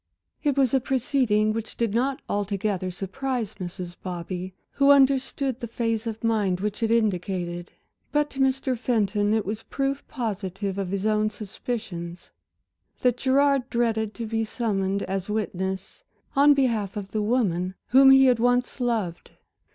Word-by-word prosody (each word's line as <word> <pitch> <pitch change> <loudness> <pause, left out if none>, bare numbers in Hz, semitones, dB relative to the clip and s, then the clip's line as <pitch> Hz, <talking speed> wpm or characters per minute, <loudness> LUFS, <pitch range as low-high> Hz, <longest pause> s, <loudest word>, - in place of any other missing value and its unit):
It 285 -3 +1
was 265 -3 +3
a 265 - +5
proceeding 240 -5 +1
which 225 0 -5
did 230 -3 0
not 260 +4 0
altogether 200 -2 -1
surprise 225 +5 -3
Mrs. 175 -1 -6
Bobby, 180 +1 -5 0.2
who 275 0 +3
understood 270 -2 +3
the 235 - -5
phase 230 0 -2
of 225 0 -5
mind 210 -5 +1
which 210 +3 -3
it 225 - +1
indicated; 180 -5 0 0.4
but 295 0 +2
to 275 - -8
Mr. 265 -1 +1
Fenton 210 -4 +1
it 220 -1 +1
was 210 +3 -3
proof 275 +2 -2
positive 200 - -3
of 190 -2 -2
his 195 +1 -2
own 215 0 +2
suspicions, 200 -4 -6 0.7
that 250 -1 +2
Gerard 270 0 +2
dreaded 225 -3 0
to 230 - -4
be 225 0 -1
summoned 200 -4 -1
as 190 +1 -3
witness 190 - -3 0.3
on 285 +1 +6
behalf 225 -8 0
of 200 -1 -6
the 215 - -1
woman 190 -5 0
whom 270 +2 +7
he 270 0 +8
had 250 -3 +4
once 245 +2 +1
loved. 220 -8 -1
220 Hz, 150 wpm, -25 LUFS, 195-255 Hz, 0.7 s, he